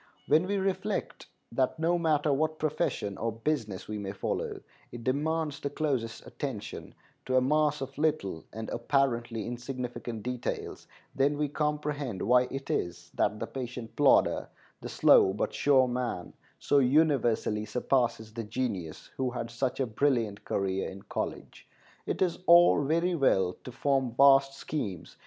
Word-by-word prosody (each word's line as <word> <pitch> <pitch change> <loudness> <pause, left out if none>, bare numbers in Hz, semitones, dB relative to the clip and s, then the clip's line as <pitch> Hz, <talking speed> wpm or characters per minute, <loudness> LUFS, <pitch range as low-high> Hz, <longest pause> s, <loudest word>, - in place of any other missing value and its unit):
When 160 +5 +3
we 200 +1 0
reflect 190 -1 -2 0.2
that 130 +5 0
no 170 +2 +1
matter 155 -3 +2
what 155 +3 0
profession 125 -10 -2
or 115 +2 -1
business 115 -4 -3
we 105 0 -4
may 100 -1 -5
follow, 100 - -3 0.3
it 120 -1 -8
demands 150 +3 -1
the 140 - -3
closest 130 -6 -2
attention - - -6 0.3
to 130 - +1
a - - +7
mass 150 +2 +2
of 135 0 -5
little 150 - 0
and 110 +1 -6
apparently 120 -4 0
insignificant 120 -2 -5
details, 125 -1 -4 0.3
then 140 +2 +2
we 150 -1 0
comprehend 150 -7 -2
why 125 +2 +4
it 135 0 -5
is 85 0 -3
that 105 +1 0
the - - -2
patient 125 -3 -7
plodder, - - +3 0.3
the - - -6
slow 95 - +5
but 105 - -2
sure 135 -3 +4
man, 120 -8 -3 0.2
so 145 - +3
universally 130 -6 +2
surpasses 115 -1 0
the 115 0 -4
genius 105 -8 -4
who 130 -1 0
had 120 -2 -5
such 125 +3 -2
a 135 - +2
brilliant 115 -3 0
career 95 -1 -1
in 95 0 -10
college. - - -5 0.4
It - - +1
is 180 -3 -1
all 170 -3 +7
very 170 +5 +1
well 95 - +2
to 125 - -6
form 135 -2 0
vast 135 0 +6
schemes. 105 - -5
130 Hz, 150 wpm, -29 LUFS, 115-145 Hz, 0.4 s, a